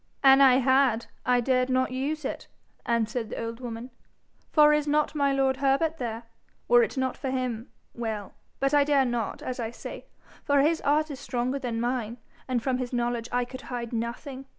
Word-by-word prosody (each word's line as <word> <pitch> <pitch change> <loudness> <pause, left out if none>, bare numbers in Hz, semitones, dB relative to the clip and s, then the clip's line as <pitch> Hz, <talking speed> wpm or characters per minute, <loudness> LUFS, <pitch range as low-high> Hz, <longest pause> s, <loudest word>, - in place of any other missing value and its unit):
'An' 270 0 +7
I 265 -2 +7
had, 260 -3 +3 0.2
I 250 -1 +4
dared 255 +1 +1
not 255 0 +1
use 280 +3 -3
it,' - - -5 0.4
answered 230 0 0
the - - -5
old 230 +1 -5
woman; 240 0 -7 0.6
'for 300 -1 +6
is 300 0 +1
not 300 +1 +1
my 280 -2 +2
lord 270 -1 +1
Herbert 280 +4 +1
there? 230 -2 -4 0.4
Were 485 0 +6
it 460 - -1
not 260 -1 0
for 270 - -4
him 255 -3 -3 0.2
well. 220 -4 -4 0.3
But 275 +1 +1
I 290 -1 +6
dare 280 -2 +3
not, 240 -3 -3
as 255 0 -4
I 225 -2 -2
say, 235 - -9 0.4
for 285 -1 +3
his 315 +3 +2
art 300 +2 +1
is 270 - -7
stronger 255 +2 -2
than 235 -3 -3
mine, 240 -1 -2 0.3
and 250 -3 -1
from 260 -2 0
his 250 -1 -4
knowledge 240 -1 -1
I 245 0 +1
could 255 +1 -9
hide 240 -2 -4
nothing. 255 +4 -5
255 Hz, 195 wpm, -27 LUFS, 240-275 Hz, 0.6 s, An